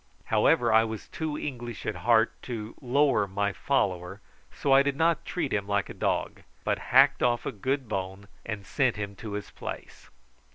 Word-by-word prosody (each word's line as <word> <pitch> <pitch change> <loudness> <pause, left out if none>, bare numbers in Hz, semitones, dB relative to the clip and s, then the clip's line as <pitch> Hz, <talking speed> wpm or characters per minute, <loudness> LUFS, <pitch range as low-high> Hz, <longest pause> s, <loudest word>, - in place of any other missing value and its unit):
However, 120 -2 +4
I 110 0 +6
was 110 -2 -5
too 155 -2 -3
English 120 -6 -6
at - - -2
heart 115 -1 +3 0.2
to 110 -2 -5
lower 130 -5 +2
my 100 +1 -1
follower, 95 -8 -1 0.3
so 140 - -2
I 135 - +8
did 140 0 0
not 165 +2 +1
treat 160 -6 -2
him 100 -1 -1
like 100 -1 0
a - - -6
dog, - - -1 0.2
but - - 0
hacked - - +6
off 120 -1 +1
a - - -1
good 130 +5 -2
bone 95 0 -4 0.2
and 105 -3 -5
sent 130 +1 +1
him 100 -1 -5
to 110 -3 -7
his 105 0 -5
place. - - -8
115 Hz, 180 wpm, -28 LUFS, 100-135 Hz, 0.3 s, I